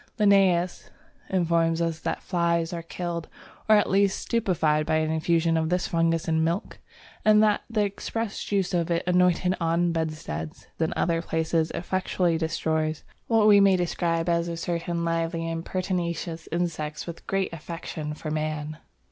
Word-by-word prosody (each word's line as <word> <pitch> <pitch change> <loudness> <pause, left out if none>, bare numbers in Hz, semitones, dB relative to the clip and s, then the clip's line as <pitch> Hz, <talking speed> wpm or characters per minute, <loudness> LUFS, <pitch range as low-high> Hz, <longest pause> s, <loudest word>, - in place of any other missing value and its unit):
Linnæus 190 -4 +3 0.4
informs 170 -2 +2
us 165 -1 -1
that - - -3
flies 170 -2 0
are 170 - -3
killed 170 0 -5 0.4
or 215 - +8
at 210 - +3
least 195 0 +2
stupefied 165 -9 +1
by 155 +1 0
an 155 0 +1
infusion 165 +1 +1
of 160 0 0
this 180 0 +1
fungus 165 -1 +1
in 160 0 +2
milk 170 +4 -2 0.4
and 215 0 +6
that 210 -1 +3
the 215 -2 +1
expressed 215 +2 -4
juice 195 -2 0
of 170 -1 0
it 170 -1 0
anointed 180 0 +3
on 170 +1 +2
bedsteads 155 - -4
and 160 -1 +1
other 165 -1 0
places 160 -1 0
effectually 180 -1 0
destroys" 160 -1 -1 0.2
what 225 -2 +4
we 205 -1 +8
may 195 -1 +5
describe 170 -1 0
as 170 0 +1
certain 170 0 -2
lively 165 0 -1
and 165 0 -4
pertinacious 170 -3 -3
insects 160 -3 -2
with 170 -1 -7
a - - -26
great 195 -3 -1
affection 160 -2 -6
for 155 0 -6
man! 155 0 -3
170 Hz, 155 wpm, -26 LUFS, 160-180 Hz, 0.4 s, or